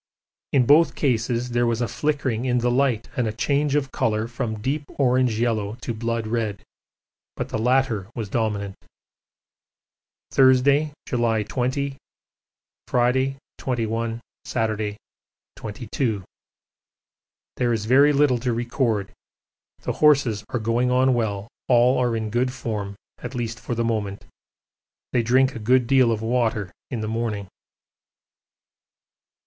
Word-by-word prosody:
In 130 -3 +4
both 155 +6 +5
cases 120 -2 0
there 120 0 +2
was 115 -1 0
a 120 - 0
flickering 130 -1 -1
in 125 -1 +1
the 120 0 +1
light 125 -3 +1
and 120 -3 0
a - - -1
change 140 +5 0
of 140 -3 0
colour 110 0 0
from 115 -2 -4
deep 140 +6 -2
orange 125 -4 +2
yellow 110 -3 0
to 120 - -3
blood 115 0 -2
red, 110 -3 -2 0.7
but - - -4
the 110 - -2
latter 120 -4 +1
was 115 -3 -3
dominant. 100 -2 -1 1.6
Thursday, 140 +3 +4
July 115 -3 +1
20, 135 +5 -2 0.9
Friday 130 +2 +1 0.2
21, 115 -2 -2 0.2
Saturday 110 -2 -2 0.6
22. 110 -1 -3 1.3
There 120 -1 +1
is 110 -2 -1
very 140 +5 +5
little 140 -4 +3
to 125 0 -1
record 115 -4 -1 0.7
the - - -1
horses 140 -8 +4
are - - -1
going 115 +3 +1
on 130 +1 +3
well, 105 -4 -1 0.2
all 125 +1 +4
are 120 -2 +1
in 110 -1 -3
good 125 +2 +1
form, 105 -6 -4 0.2
at 135 - -7
least 115 -2 -3
for 120 - -4
the 115 0 0
moment. 105 -3 -2 0.9
They 120 - +3
drink 130 +3 +3
a - - -5
good 125 +3 +3
deal 130 -1 +4
of 110 -1 -2
water 110 -5 0 0.2
in 120 -5 -3
the 110 - -3
morning. 110 -3 -3
120 Hz, 135 wpm, -23 LUFS, 110-130 Hz, 1.6 s, both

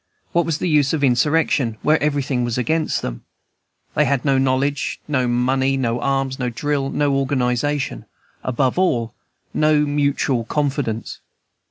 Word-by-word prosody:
What 170 0 +1
was 160 -2 0
the 180 - -2
use 150 -3 +3
of 150 -3 -1
insurrection, 135 -2 +2
where 155 +1 +3
everything 140 -4 0
was 120 -1 -2
against 155 +6 0
them? - - -5 0.7
They - - +3
had 140 -2 0
no 135 -2 +3
knowledge, 135 +1 0
no 130 -4 +1
money, 130 +3 +1
no 120 -2 -1
arms, 135 -1 -1
no 125 -1 -1
drill, 140 +3 -1
no 145 -1 +1
organization, 135 - -1 0.4
above 130 +4 0
all, 120 -11 +1 0.4
no 155 -1 +3
mutual 145 -4 +1
confidence. 135 -4 -2
135 Hz, 145 wpm, -20 LUFS, 125-145 Hz, 0.7 s, use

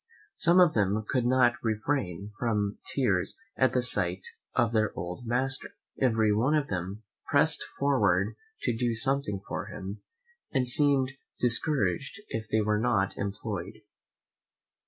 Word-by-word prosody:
Some 170 +2 +5
of 175 -3 +5
them 105 0 0
could 125 -3 0
not 125 -1 +2
refrain 105 - -2
from 105 -4 -1
tears 100 -9 0 0.2
at 130 - +2
the 125 - +1
sight 95 -5 +4 0.3
of 120 -1 +1
their 110 -2 +1
old 90 +7 -6
master; 130 +3 0 0.3
every 110 -4 +3
one 125 +9 +2
of 150 -2 0
them 95 +3 -4 0.2
press'd 150 +1 +4 0.2
forward 140 0 +1 0.3
to 115 - 0
do 120 0 -1
something 135 -4 +1
for - - -4
him, 95 +3 -8 0.5
and 130 -3 +1
seemed 135 0 +3 0.3
discouraged 125 - +1
if 110 -1 -5
they 110 - +1
were 105 0 0
not 100 -4 0
employed. 100 -1 -5
115 Hz, 135 wpm, -28 LUFS, 105-135 Hz, 0.5 s, Some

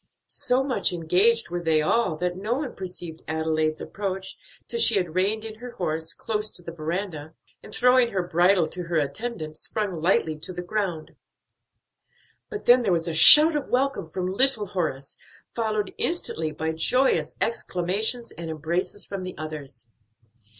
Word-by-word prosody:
So 265 -2 0
much 270 -2 0
engaged 180 +5 +2
were 175 0 -3
they 160 -2 +2
all 185 +3 +1
that 180 +1 -2
no 210 +6 -2
one 280 -1 -4
perceived 175 -3 -8
Adelaide's 155 0 -1
approach 190 -1 -5 0.3
till 470 - -4
she 235 - +6
had 180 -5 -1
reined 200 +4 0
in 220 -1 -8
her 245 0 -9
horse 160 -5 -3
close 215 -1 -2
to 175 - -9
the 170 - -7
veranda, 160 -1 -5 0.3
and - - -13
throwing 250 -1 +4
her 190 -4 -1
bridle 175 0 +3
to 180 - -5
her 170 0 -4
attendant, 155 - -3
sprung 210 -3 -2
lightly 160 -3 +1
to 165 +4 -5
the 180 0 -6
ground. 180 -4 -3 1.3
But 420 - -7
then 245 +1 +6
there 210 -5 0
was 170 -1 0
a 165 - -2
shout 300 - +9
of 295 - -2
welcome 255 -8 0
from 180 +3 -4
little 255 -1 +3
Horace, 160 -8 -4 0.3
followed 215 -3 -2
instantly 165 - -2
by 160 +1 -3
joyous 250 +12 +1
exclamations 220 +3 -2
and 165 -1 -8
embraces 170 +6 -3
from 195 -1 -5
the 185 0 -7
others. 150 -6 -8
185 Hz, 165 wpm, -25 LUFS, 160-225 Hz, 1.3 s, shout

